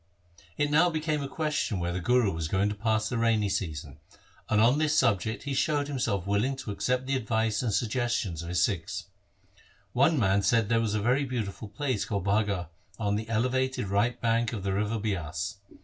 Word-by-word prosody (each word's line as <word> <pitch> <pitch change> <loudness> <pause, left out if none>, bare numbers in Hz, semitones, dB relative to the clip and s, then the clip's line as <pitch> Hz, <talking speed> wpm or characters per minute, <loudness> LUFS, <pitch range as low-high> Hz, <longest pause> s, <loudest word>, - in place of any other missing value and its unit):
It 145 0 +1
now 160 +4 +5
became 155 -2 -1
a 140 - -3
question 150 -8 -1
where 85 0 -1
the 90 - -2
Guru 120 +2 +3
was 80 -1 -3
going 95 +5 +1
to - - -2
pass 110 0 0
the 120 - -2
rainy 110 -3 +2
season, 80 -7 -4 0.5
and 105 - +3
on 120 +7 +4
this 155 0 +2
subject 110 +3 +1
he 140 0 -3
showed 145 +1 +1
himself 110 -10 -1
willing 105 +7 +1
to 130 -5 -6
accept 125 +5 -1
the 135 +1 0
advice 110 -3 0
and 120 -4 0
suggestions 115 -6 -1
of 85 - -7
his 90 -2 +2
Sikhs. 90 -5 -4 0.9
One 140 +5 +4
man 100 -4 +3
said 115 +3 +3
that 105 - -8
there 115 -1 +3
was 110 -2 0
a 105 - 0
very 130 +5 +2
beautiful 115 -5 -4
place 120 +1 -2
called 100 -4 -3
Bagha 100 -4 0 0.3
on 105 -2 0
the 110 +1 -4
elevated 130 -1 0
right 115 +5 +1
bank 115 0 +1
of 100 -4 -4
the 100 -1 -1
river 105 +3 0
Bias. 95 -1 -3
110 Hz, 200 wpm, -28 LUFS, 100-130 Hz, 0.9 s, now